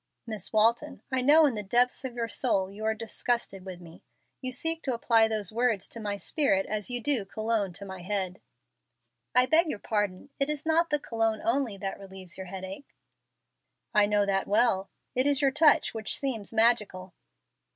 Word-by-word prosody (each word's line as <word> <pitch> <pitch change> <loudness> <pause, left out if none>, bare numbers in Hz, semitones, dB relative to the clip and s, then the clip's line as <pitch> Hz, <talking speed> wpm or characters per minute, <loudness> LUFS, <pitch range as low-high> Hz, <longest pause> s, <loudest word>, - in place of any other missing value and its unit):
"Miss 220 -3 -4
Walton, 230 +7 +1
I 260 -1 +1
know 300 +5 +6
in 280 - +2
the 210 - -3
depths 240 +7 +1
of 255 -2 -5
your 235 -1 -2
soul 195 -2 0
you 210 +2 -9
are 220 0 +1
disgusted 225 -3 -2
with 185 -2 -8
me. 170 -2 -14 0.4
You 255 -1 -1
seek 325 +6 0
to 260 -3 -2
apply 230 -1 +3
those 215 -3 -2
words 230 -3 +1
to 230 - -7
my 205 -2 -3
spirit 200 -5 +2
as 210 +1 -1
you 245 0 -2
do 240 -2 0
cologne 215 0 -2
to 200 +3 -8
my 190 -2 -8
head." 190 -1 -3 0.9
"I 250 0 +6
beg 320 +5 +3
your 300 - -3
pardon. 205 +3 -2
It 275 +1 +1
is 300 -1 -3
not 330 +1 +3
the 295 - +2
cologne 225 -5 -1
only 235 -3 0
that 195 0 -5
relieves 190 -2 -8
your 190 -1 -7
headache." 190 +7 -8 1.0
"I 210 -1 +5
know 205 -1 +2
that 195 -1 0
well. 200 -2 +2 0.2
It 255 +2 +1
is 285 -2 +2
your 275 -2 +3
touch, 300 +2 +4
which 220 -1 -3
seems 235 -8 -3
magical." 215 -5 +1
220 Hz, 190 wpm, -28 LUFS, 195-255 Hz, 1.0 s, know